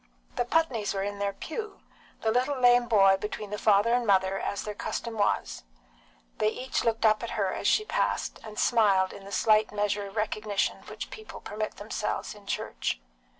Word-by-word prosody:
The 245 Hz, -, 0 dB
Putneys 245 Hz, -9 st, +1 dB
were 195 Hz, -, -1 dB
in 205 Hz, 0 st, -4 dB
their 200 Hz, 0 st, 0 dB
pew, 420 Hz, -, -6 dB, 0.4 s
the 220 Hz, -, +1 dB
little 255 Hz, +4 st, +1 dB
lame 245 Hz, -1 st, +5 dB
boy 195 Hz, -4 st, +5 dB
between 210 Hz, 0 st, -5 dB
the 210 Hz, -, -3 dB
father 210 Hz, +2 st, +4 dB
and 245 Hz, -1 st, +1 dB
mother, 190 Hz, -1 st, +3 dB
as 200 Hz, -, -3 dB
their 210 Hz, -, -4 dB
custom 230 Hz, +2 st, -4 dB
was. 200 Hz, -, 0 dB, 0.8 s
They 215 Hz, -, +3 dB
each 255 Hz, +4 st, -2 dB
looked 225 Hz, -1 st, +1 dB
up 215 Hz, -1 st, +4 dB
at 235 Hz, -, -4 dB
her 195 Hz, -3 st, +1 dB
as -, -, -2 dB
she 430 Hz, -, +3 dB
passed, -, -, -1 dB
and 215 Hz, -1 st, -9 dB
smiled 200 Hz, -5 st, +3 dB
in 195 Hz, -, -11 dB
the 200 Hz, -, -10 dB
slight 215 Hz, 0 st, +3 dB
measure 205 Hz, -1 st, -1 dB
of 195 Hz, -, -12 dB
recognition 215 Hz, -1 st, -1 dB
which -, -, -7 dB
people 435 Hz, 0 st, -9 dB
permit 215 Hz, +1 st, -5 dB
themselves 210 Hz, +1 st, -3 dB
in 205 Hz, -1 st, -16 dB
church. -, -, -2 dB
215 Hz, 190 wpm, -28 LUFS, 200-235 Hz, 0.8 s, lame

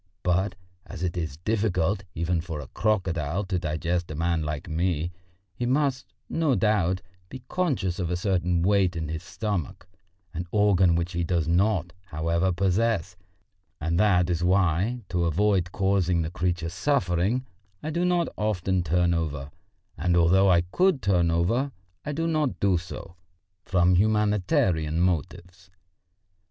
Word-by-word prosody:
But 95 Hz, +3 st, +1 dB, 0.3 s
as 85 Hz, -, -7 dB
it 90 Hz, -1 st, -1 dB
is 80 Hz, -4 st, -4 dB
difficult 100 Hz, 0 st, 0 dB
even 85 Hz, +1 st, 0 dB
for 80 Hz, -3 st, -6 dB
a 70 Hz, -, -7 dB
crocodile 90 Hz, -, -1 dB
to 95 Hz, -2 st, -2 dB
digest 85 Hz, +3 st, -2 dB
a 80 Hz, -, -5 dB
man 85 Hz, +1 st, 0 dB
like 75 Hz, 0 st, -4 dB
me, 85 Hz, 0 st, -1 dB, 0.4 s
he 120 Hz, +7 st, -3 dB
must, 135 Hz, 0 st, 0 dB, 0.2 s
no 160 Hz, -5 st, +1 dB
doubt, 95 Hz, -5 st, +1 dB, 0.3 s
be 130 Hz, -1 st, -9 dB
conscious 130 Hz, -, -1 dB
of 90 Hz, -3 st, -1 dB
a 90 Hz, -, 0 dB
certain 90 Hz, -3 st, 0 dB
weight 95 Hz, -2 st, +2 dB
in 80 Hz, -2 st, -3 dB
his 80 Hz, +1 st, -4 dB
stomach 90 Hz, -1 st, -4 dB, 0.5 s
an 85 Hz, +1 st, -4 dB
organ 95 Hz, -4 st, +3 dB
which 85 Hz, +1 st, -1 dB
he 85 Hz, 0 st, -1 dB
does 85 Hz, -2 st, 0 dB
not, 90 Hz, 0 st, +1 dB
however, 85 Hz, +2 st, 0 dB
possess 95 Hz, 0 st, 0 dB, 0.6 s
and 85 Hz, +3 st, 0 dB
that 90 Hz, -4 st, +4 dB
is 85 Hz, 0 st, -1 dB
why, 95 Hz, +6 st, +1 dB
to 90 Hz, -2 st, 0 dB
avoid 90 Hz, +1 st, +1 dB
causing 95 Hz, -3 st, +1 dB
the 80 Hz, -, -4 dB
creature 90 Hz, -1 st, -1 dB
suffering, 95 Hz, -, 0 dB, 0.4 s
I 155 Hz, -, -3 dB
do 170 Hz, +3 st, 0 dB
not 175 Hz, -1 st, +2 dB
often 95 Hz, -3 st, 0 dB
turn 85 Hz, +1 st, +1 dB
over, 75 Hz, -4 st, -3 dB, 0.5 s
and 85 Hz, +1 st, +2 dB
although 95 Hz, +3 st, +5 dB
I 85 Hz, -2 st, +5 dB
could 155 Hz, -, +1 dB
turn 90 Hz, -3 st, +2 dB
over 115 Hz, +12 st, +1 dB, 0.3 s
I 150 Hz, -, -3 dB
do 165 Hz, +3 st, -2 dB
not 155 Hz, -5 st, 0 dB
do 95 Hz, -3 st, +2 dB
so 85 Hz, 0 st, -9 dB, 0.5 s
from 90 Hz, -1 st, +3 dB
humanitarian 95 Hz, -6 st, +2 dB
motives. 90 Hz, +2 st, -2 dB
90 Hz, 150 wpm, -26 LUFS, 85-105 Hz, 0.6 s, although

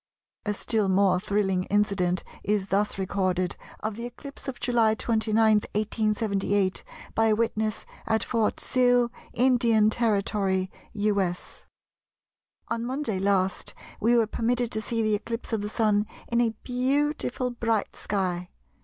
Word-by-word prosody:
A 210 Hz, -, 0 dB
still 215 Hz, -2 st, 0 dB
more 190 Hz, -1 st, +4 dB
thrilling 190 Hz, -2 st, 0 dB
incident 195 Hz, -3 st, +1 dB, 0.2 s
is 200 Hz, -2 st, 0 dB
thus 205 Hz, +1 st, +1 dB
recorded 185 Hz, -2 st, 0 dB, 0.3 s
of 215 Hz, -1 st, -3 dB
the 235 Hz, +1 st, -4 dB
eclipse 275 Hz, +4 st, -11 dB
of 265 Hz, -, -5 dB
July 235 Hz, -3 st, +3 dB
29, 220 Hz, -1 st, 0 dB, 0.2 s
1878, 210 Hz, -2 st, 0 dB, 0.3 s
by 225 Hz, 0 st, +3 dB
a 215 Hz, -, +4 dB
witness 220 Hz, -1 st, -1 dB, 0.2 s
at 220 Hz, 0 st, +2 dB
Fort 225 Hz, -3 st, 0 dB
Sill, 245 Hz, -1 st, +3 dB, 0.2 s
Indian 235 Hz, -4 st, +4 dB
Territory, 200 Hz, -4 st, 0 dB, 0.2 s
U.S.:— 200 Hz, -4 st, -1 dB, 1.0 s
"On 230 Hz, -, -1 dB
Monday 245 Hz, -5 st, -2 dB
last 190 Hz, -1 st, 0 dB, 0.2 s
we 235 Hz, +3 st, +3 dB
were 230 Hz, -2 st, +4 dB
permitted 235 Hz, +2 st, -1 dB
to 220 Hz, -, -2 dB
see 230 Hz, +1 st, -1 dB
the 215 Hz, -1 st, +2 dB
eclipse 230 Hz, +3 st, -3 dB
of 220 Hz, -, 0 dB
the 205 Hz, -, -3 dB
Sun 210 Hz, -1 st, +1 dB, 0.2 s
in 235 Hz, 0 st, +2 dB
a 225 Hz, -2 st, +1 dB
beautiful 260 Hz, 0 st, 0 dB
bright 230 Hz, -3 st, -1 dB
sky. 180 Hz, -3 st, -2 dB
215 Hz, 135 wpm, -26 LUFS, 200-235 Hz, 1.0 s, more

